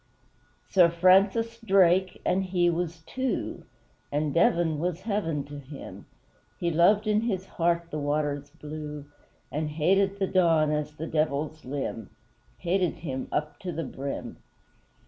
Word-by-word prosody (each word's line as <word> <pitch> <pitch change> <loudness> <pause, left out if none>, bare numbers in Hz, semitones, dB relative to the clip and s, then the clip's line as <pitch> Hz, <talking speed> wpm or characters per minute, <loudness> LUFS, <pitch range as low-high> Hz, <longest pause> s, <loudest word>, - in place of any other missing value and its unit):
Sir 180 -3 +5
FRANCIS 195 +7 +3
DRAKE, 190 -4 +3
and 190 +1 +1
he 175 -2 +2
was 170 -1 -3
TWO 260 +8 -3 0.5
And 145 0 0
Devon 170 -2 +3
was 175 +1 -2
heaven 190 -8 -1
to 145 +1 -9
him, 140 +1 -10 0.5
He 170 -1 0
loved 200 +6 +4
in 215 0 +2
his 195 -5 -2
heart 170 -1 0
the 155 - -3
waters 145 0 -1
blue 150 -1 -7 0.5
And 150 +1 -2
hated 195 +6 +2
the 195 - +1
Don 165 -5 +3
as 150 0 -2
the 155 +2 -6
Devil's 155 0 -1
limb 130 -5 -4 0.5
Hated 180 0 0
him 130 -3 -3
up 150 0 -2
to 185 - -4
the 165 0 -3
brim! 135 0 -5
165 Hz, 140 wpm, -27 LUFS, 150-185 Hz, 0.5 s, Sir